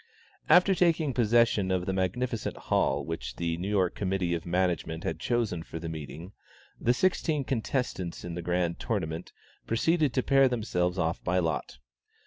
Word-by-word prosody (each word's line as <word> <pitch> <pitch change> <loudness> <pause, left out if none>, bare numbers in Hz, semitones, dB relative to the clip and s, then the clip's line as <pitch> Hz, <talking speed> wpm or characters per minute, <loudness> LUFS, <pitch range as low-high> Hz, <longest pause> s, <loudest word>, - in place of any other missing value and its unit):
After 185 +2 +6
taking 165 -6 +2
possession 115 -4 +3
of 90 -1 0
the 95 - -1
magnificent 105 +5 -2
hall - - 0
which 65 -7 -5
the 85 +2 -1
New 95 +4 -3
York 95 -4 +2
Committee 95 -3 -1
of 85 0 -3
Management 85 -2 0
had 80 - -3
chosen 110 -5 0
for 80 - -8
the 80 0 -5
meeting, 80 +3 -7 0.5
the 120 - +2
sixteen 155 +1 +1
contestants 115 -9 -2
in 85 - -5
the 85 - -4
Grand 85 0 -1
Tournament, 80 +2 -3 0.4
proceeded 155 +5 +2
to 130 - +2
pair 135 -1 +5
themselves 100 -7 -1
off 85 -1 -1
by 90 +1 +1
lot. 80 -7 -1
95 Hz, 160 wpm, -28 LUFS, 85-120 Hz, 0.5 s, After